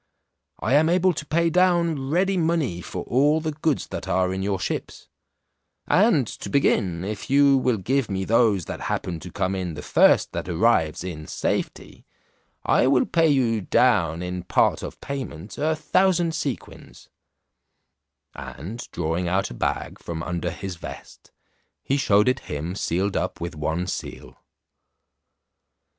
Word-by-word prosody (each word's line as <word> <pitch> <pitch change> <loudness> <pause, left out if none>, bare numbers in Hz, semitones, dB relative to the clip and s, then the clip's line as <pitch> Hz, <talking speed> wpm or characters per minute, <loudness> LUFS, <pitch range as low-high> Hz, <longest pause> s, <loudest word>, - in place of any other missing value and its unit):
I 115 - 0
am 155 +3 +5
able 185 +1 +3
to 150 - -6
pay 165 +3 +1
down 170 -6 +2
ready 190 +5 +2
money 160 - 0
for - - -6
all 145 +5 +2
the 160 0 -2
goods 155 -1 -1
that - - -6
are 90 +1 +1
in 95 - -3
your 95 -1 -1
ships: - - -5 0.8
and 185 - +4
to 100 - -7
begin, 95 -9 +1
if 105 +5 -5
you 140 0 +5
will 130 -3 +1
give 130 +5 0
me 95 -1 -2
those 110 -5 +3
that - - -6
happen 85 -3 -2
to - - -10
come 95 +1 -1
in 90 -4 -3
the 75 - -7
first - - +4
that - - -5
arrives 85 -4 +2
in 80 -4 -6
safety, - - -4 0.6
I 125 - +3
will 130 -2 +3
pay 165 -1 +2
you 120 -6 +2
down 90 -7 +2
in 90 0 -4
part 90 - +2
of - - -7
payment 125 - -6
a 155 +2 +1
thousand 175 +2 +2
sequins," 140 -6 -6 1.3
and 95 - -8
drawing 85 +3 -2
out 95 +3 0
a - - -5
bag - - -3
from 85 -1 -5
under 85 -2 -2
his 95 -3 -6
vest, - - -10 0.5
he 135 - 0
shewed 105 -6 +3
it 130 +1 +2
him 75 +4 -3
sealed 95 +1 -1
up - - -2
with 85 0 -4
one 80 +4 -2
seal. 90 - -6
115 Hz, 155 wpm, -24 LUFS, 90-150 Hz, 1.3 s, am